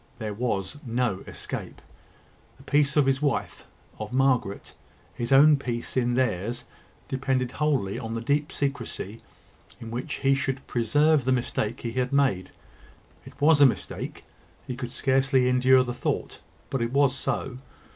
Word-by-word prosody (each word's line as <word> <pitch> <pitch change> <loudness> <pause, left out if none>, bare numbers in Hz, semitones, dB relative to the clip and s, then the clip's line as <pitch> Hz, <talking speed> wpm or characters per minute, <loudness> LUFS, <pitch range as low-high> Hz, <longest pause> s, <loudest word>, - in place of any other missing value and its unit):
There 110 -2 -4
was 105 0 -2
no 120 -5 -1
escape. - - -7 0.8
The 135 - -17
peace 145 0 +2
of 145 - +5
his 135 +1 +1
wife, 145 -2 -2 0.3
of 110 +1 -5
Margaret 130 -6 +1 0.4
his 120 +1 -4
own 145 +2 +7
peace 120 -3 -4
in 120 -1 +1
theirs 120 -1 -1 0.4
depended 130 -1 -1
wholly 140 -10 0
on 115 0 -5
the - - -2
deep 145 +5 0
secrecy 120 -6 -4 0.6
in 115 -2 -8
which 125 +5 -4
he 135 0 +2
should 135 -1 -2
preserve 145 +5 +2
the 130 - +1
mistake 120 -4 -1
he 115 - -3
had 125 +1 -1
made. 135 -10 +2 0.8
It - - -14
was 145 0 +5
a 140 - +10
mistake. 125 - -4 0.4
He 125 - -5
could 125 0 -5
scarcely 130 0 +2
endure 130 +1 +5
the 125 -1 -4
thought; - - -3 0.3
but 135 - -1
it 115 0 -1
was 140 -1 +3
so. 130 -2 -3
130 Hz, 155 wpm, -26 LUFS, 120-140 Hz, 0.8 s, a